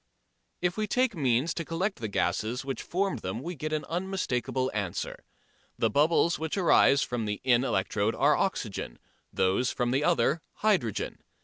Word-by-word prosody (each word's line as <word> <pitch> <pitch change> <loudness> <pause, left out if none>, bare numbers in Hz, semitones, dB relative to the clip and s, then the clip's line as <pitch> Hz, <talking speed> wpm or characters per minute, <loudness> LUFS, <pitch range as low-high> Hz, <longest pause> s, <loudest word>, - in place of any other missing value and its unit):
If 180 +2 0
we 215 0 0
take 250 0 +1
means 135 +1 +1
to 165 - -3
collect 180 +6 -2
the 115 - -3
gases 110 +6 -1
which 135 -3 -3
formed 185 - -1
them 100 +6 -4
we 175 - -4
get 155 0 -5
an 155 -1 -1
unmistakable 150 - -2
answer. 100 -5 -3 0.5
The - - +1
bubbles 160 +3 +3
which 160 +4 -3
arise 140 -6 +5
from 120 -3 -3
the 105 -1 -3
in 125 -1 +4
electrode 100 -1 0
are 145 +3 +4
oxygen, 110 - -2 0.3
those 100 +6 +1
from 120 +3 -1
the 135 +3 +1
other 140 +4 +2
hydrogen. 190 - 0
135 Hz, 165 wpm, -28 LUFS, 115-170 Hz, 0.5 s, arise